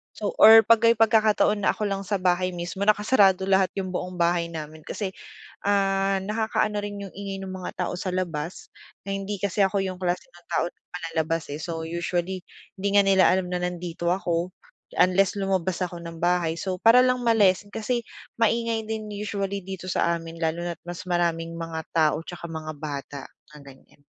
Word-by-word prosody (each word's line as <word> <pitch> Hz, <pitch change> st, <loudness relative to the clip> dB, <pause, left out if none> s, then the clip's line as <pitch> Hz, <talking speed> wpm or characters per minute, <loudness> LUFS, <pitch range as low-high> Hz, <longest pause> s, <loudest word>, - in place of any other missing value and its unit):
so -, -, -6 dB, 0.2 s
or 225 Hz, +1 st, +11 dB
'pag 230 Hz, -1 st, +5 dB
may 230 Hz, 0 st, +6 dB
pagkakataon 215 Hz, -2 st, +3 dB
na -, -, +4 dB
ako 210 Hz, -, -2 dB
lang 195 Hz, 0 st, -2 dB
sa 200 Hz, 0 st, -1 dB
bahay 185 Hz, 0 st, +1 dB
mismo 175 Hz, +3 st, -4 dB
nakasarado 205 Hz, -3 st, +4 dB
lahat 190 Hz, -1 st, +3 dB
yung 185 Hz, -1 st, -4 dB
buong 180 Hz, 0 st, -4 dB
bahay 170 Hz, 0 st, +2 dB
namin. 155 Hz, -1 st, -7 dB
Kasi, 195 Hz, -3 st, -4 dB, 0.5 s
ah, 195 Hz, -1 st, +2 dB
nakakaano 215 Hz, 0 st, -1 dB
rin 205 Hz, -1 st, -6 dB
yung 195 Hz, -, -7 dB
ingay 195 Hz, -1 st, -5 dB
ng 190 Hz, -, -6 dB
mga 185 Hz, -1 st, -6 dB
tao -, -, -3 dB
sa 185 Hz, -1 st, -3 dB
labas. 170 Hz, -2 st, -4 dB, 0.3 s
Na 195 Hz, -, -7 dB
hindi 195 Hz, 0 st, -4 dB
kasi 200 Hz, 0 st, +2 dB
ako 195 Hz, +1 st, +1 dB
yung 185 Hz, -1 st, -3 dB
klase 180 Hz, -1 st, -2 dB
ng 175 Hz, 0 st, -20 dB
tao -, -, +2 dB, 0.3 s
palalabas 165 Hz, -1 st, -2 dB
eh. 145 Hz, -, -4 dB
So, 165 Hz, 0 st, -4 dB
usually 175 Hz, +2 st, -2 dB, 0.3 s
di 200 Hz, +1 st, -1 dB
nga 205 Hz, -, +7 dB
nila 195 Hz, -1 st, +4 dB
alam 185 Hz, -1 st, +2 dB
na 180 Hz, -, -1 dB
nandito 175 Hz, -1 st, -2 dB
ako 175 Hz, -1 st, -1 dB, 0.5 s
unless 190 Hz, +2 st, +3 dB
lumabas 190 Hz, -2 st, 0 dB
ako 175 Hz, -1 st, -9 dB
ng 165 Hz, -1 st, -8 dB
bahay. 175 Hz, -1 st, +1 dB
So, 185 Hz, +2 st, -2 dB
para 230 Hz, +2 st, +7 dB
lang 255 Hz, -1 st, +1 dB
ma-lessen 205 Hz, -4 st, +3 dB
kasi 235 Hz, +3 st, -2 dB, 0.4 s
maingay 230 Hz, 0 st, +1 dB
din 215 Hz, -1 st, -3 dB
usually 200 Hz, -1 st, -3 dB
dito 190 Hz, -1 st, -7 dB
sa 170 Hz, -1 st, +1 dB
amin 165 Hz, 0 st, -9 dB
lalo 165 Hz, +2 st, 0 dB
na't 170 Hz, -2 st, -6 dB
mas 175 Hz, +1 st, -6 dB
maraming 170 Hz, -1 st, 0 dB
mga 165 Hz, -1 st, -4 dB
tao 155 Hz, -2 st, +3 dB
'tsaka 175 Hz, -1 st, -7 dB
mga 155 Hz, -1 st, -5 dB
bata 140 Hz, -2 st, -6 dB, 0.3 s
na -, -, -11 dB
nandiyan. 140 Hz, +1 st, -17 dB
185 Hz, 185 wpm, -25 LUFS, 170-200 Hz, 0.5 s, or